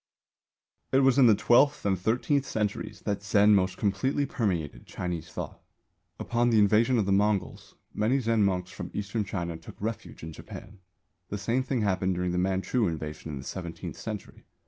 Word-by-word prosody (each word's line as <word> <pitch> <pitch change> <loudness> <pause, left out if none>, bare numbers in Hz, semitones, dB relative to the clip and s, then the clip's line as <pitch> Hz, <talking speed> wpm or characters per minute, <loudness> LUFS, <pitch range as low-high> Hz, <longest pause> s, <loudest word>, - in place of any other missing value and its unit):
It 135 - +4
was 135 0 +4
in 130 - +8
the 110 - +6
twelfth 135 +6 +3
and 100 -1 +3
thirteenth 125 - 0
centuries 105 -2 -3
that 100 - -2
Zen 105 +1 +4
most 95 -2 +2
completely 130 +8 0
permeated 85 - -2
Chinese 90 -3 -4
thought. - - -7 0.6
Upon 120 +1 +1
the 115 - +3
invasion 110 +4 +4
of 110 - +2
the 100 - 0
Mongols 100 -1 0 0.2
many 115 +6 +1
Zen 115 -3 +2
monks 95 -2 0
from - - -7
Eastern 105 +2 -2
China 85 -4 -4
took 80 - -13
refuge 110 -4 -5
in 80 0 -6
Japan; 95 +5 -11 0.5
the 105 - -3
same 115 +6 0
thing 130 -2 -1
happened 95 -2 +1
during 90 0 -1
the 90 - 0
Manchu 95 +5 +1
invasion 80 -1 -5
in 70 - -5
the 65 - -7
seventeenth 85 +1 -6
century. 105 -3 -8
100 Hz, 175 wpm, -28 LUFS, 90-115 Hz, 0.6 s, in